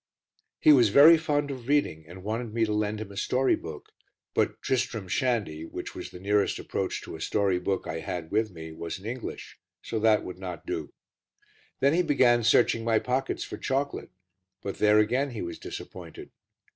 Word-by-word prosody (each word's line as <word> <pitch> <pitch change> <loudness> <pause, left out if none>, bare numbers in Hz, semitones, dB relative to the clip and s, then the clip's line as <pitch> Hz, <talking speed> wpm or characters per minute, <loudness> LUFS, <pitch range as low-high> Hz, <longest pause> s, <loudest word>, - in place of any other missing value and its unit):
He 155 - +7
was 120 -6 +5
very 145 +10 +9
fond 145 -2 0
of 125 -3 -8
reading 110 - +1
and 90 +3 -11
wanted 110 +2 -3
me 115 -1 +3
to 105 - -2
lend 105 0 -1
him 105 -2 -7
a - - -11
story 130 +6 +2
book, 80 -2 -9 0.4
but - - 0
Tristram 120 -6 -1
Shandy, 105 - -1
which 80 - -7
was - - -7
the 90 - -11
nearest 100 +1 +1
approach - - -3
to - - -8
a 80 - -9
story 100 0 +1
book 95 +1 -2
I 80 - -4
had 80 0 -5
with 110 +1 +1
me, 80 -3 -9
was 85 +1 -5
in 95 - -14
English, 120 +2 -6 0.2
so 110 - -3
that 110 -1 +4
would 90 0 -8
not 90 -3 -7
do. - - -4 0.9
Then 140 +2 +4
he 175 - +3
began 125 -7 +3
searching 115 0 +4
my 115 -1 +3
pockets 125 +4 -1
for - - -7
chocolate, 140 +1 -2 0.5
but 100 - -5
there, 105 0 +5
again, 125 +7 +2
he 110 - -4
was 85 -1 -6
disappointed. - - -9
110 Hz, 190 wpm, -27 LUFS, 95-130 Hz, 0.9 s, very